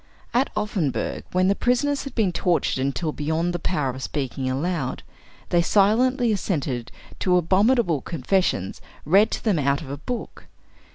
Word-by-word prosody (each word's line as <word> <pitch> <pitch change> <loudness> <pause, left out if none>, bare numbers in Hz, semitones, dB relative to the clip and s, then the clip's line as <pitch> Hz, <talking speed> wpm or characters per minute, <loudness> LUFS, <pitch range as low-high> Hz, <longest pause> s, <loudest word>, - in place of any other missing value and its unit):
At 255 +3 +2
Offenburg, 195 -9 -2
when 185 +1 +2
the 195 - +4
prisoners 275 +6 0
had 275 - -8
been 210 -6 +2
tortured 170 -5 0
until 145 +4 -1
beyond 160 +4 -1
the 175 - -2
power 150 -7 -1
of 130 +1 -8
speaking 135 -2 -3
aloud, 140 0 -2 0.5
they 175 - +3
silently 230 +7 +3
assented 145 - -2 0.3
to 180 -1 +3
abominable 185 - +2
confessions 165 - -1 0.2
read 195 +8 +5
to - - -4
them 205 -8 +2
out 140 0 +1
of 135 - -8
a 140 - -4
book. 245 - -6
175 Hz, 155 wpm, -24 LUFS, 140-210 Hz, 0.5 s, read